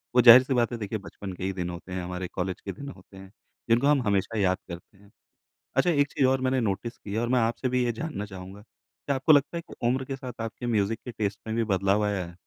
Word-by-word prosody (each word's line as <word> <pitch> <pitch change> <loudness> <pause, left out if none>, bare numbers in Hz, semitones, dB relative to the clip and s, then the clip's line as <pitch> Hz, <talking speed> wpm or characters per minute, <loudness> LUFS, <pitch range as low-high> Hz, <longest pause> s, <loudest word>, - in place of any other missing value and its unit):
वो 125 - +7
ज़ाहिर-सी 130 +3 +9
बात 120 -1 +2
है, 120 - -3
देखिए 105 0 -3
बचपन 95 -1 -8
के 90 - -8
ही 95 0 -1
दिन 90 -1 -3
होते 90 +1 -8
हैं, 90 -1 -3
हमारे 90 0 -4
कॉलेज 95 0 -3
के 95 - -5
दिन 140 +9 -8
होते 95 -4 -14
हैं, 95 0 -12 0.4
जिनको 120 +5 +4
हम 145 -3 +4
हमेशा 100 +3 0
याद 95 -1 +2
करते 90 +3 -10
हैं। 100 +1 -21 0.7
अच्छा, 175 - +4
एक 145 -3 +3
चीज़ 135 -3 +3
और 130 0 +2
मैंने 130 0 +1
नोटिस 115 +2 -2
की 100 - -9
है 110 - -1
और 120 - -1
मैं 125 -1 +3
आपसे 115 +3 0
भी 125 0 +1
ये 120 - 0
जानना 140 -4 -4
चाहूँगा। 95 +1 -10
क्या 135 +4 -6
आपको 135 +4 +4
लगता 145 +4 +3
है 170 - -3
कि - - -8
उम्र 130 +1 0
के 135 0 -5
साथ 125 -3 -8
आपके 115 +2 -5
म्यूज़िक 110 -1 +1
के 125 - -5
टेस्ट 105 -2 -2
में 110 +1 -2
भी 115 - +2
बदलाव 100 +2 +2
आया 100 -3 -1
है? 85 - -12
110 Hz, 265 wpm, -27 LUFS, 95-130 Hz, 0.7 s, ज़ाहिर-सी